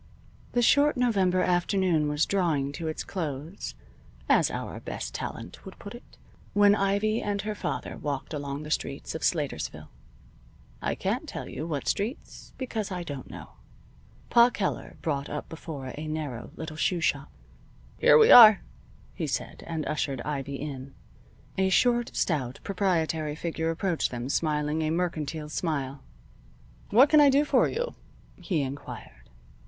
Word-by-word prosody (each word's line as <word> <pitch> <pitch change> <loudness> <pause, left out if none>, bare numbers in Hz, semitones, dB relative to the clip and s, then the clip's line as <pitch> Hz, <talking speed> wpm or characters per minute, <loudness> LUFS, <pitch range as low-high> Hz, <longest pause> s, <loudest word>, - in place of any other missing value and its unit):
The 245 - +2
short 285 +3 +4
November 195 -7 +2
afternoon 175 -3 +2
was 150 +1 +1
drawing 160 -8 0
to 160 +3 -5
its 155 - -3
close 160 0 -5 0.5
(as - - +4
our - - -5
best - - -6
talent - - -6
would 190 - -11
put 200 - -9
it) 240 - -14 0.4
when 205 0 +6
Ivy 205 +2 +1
and 205 -1 -2
her 215 0 -2
father 210 - -4
walked 145 +1 -4
along 145 0 -4
the 150 - -7
streets - - -3
of - - -5
Slatersville. - - -2 0.9
(I - - -1
can't - - -2
tell - - -6
you 155 - -5
what 145 -4 -3
streets, 220 +7 -3
because 225 -6 -3
I 180 -1 -3
don't 145 -6 -7
know.) - - -10 0.8
Pa 235 0 +7
Keller 210 -5 -3
brought 145 -3 -2
up 150 - -5
before 145 -5 -7
a 155 +1 -6
narrow 150 -6 -4
little 155 -1 -7
shoe 175 +2 +1
shop. 145 -3 0 0.7
"Here 150 - +7
we - - +7
are," 220 -4 +10 0.5
he - - -3
said, - - -4
and 160 -3 -3
ushered 145 -3 -1
Ivy 140 -1 -4
in. 135 -1 -7 0.6
A 190 0 +3
short, 240 +4 +3
stout, 135 -7 -1
proprietary 165 -6 0
figure 160 0 -2
approached 170 0 0
them 120 +1 -5
smiling 150 0 0
a 155 - 0
mercantile 160 -3 -2
smile. 140 -5 -2 0.9
"What 260 +6 +6
can 305 -1 +7
I 285 - +7
do 280 +2 +4
for - - +3
you?" - - -3 0.4
he 165 -8 -1
inquired. 135 - -8
160 Hz, 150 wpm, -27 LUFS, 145-200 Hz, 0.9 s, are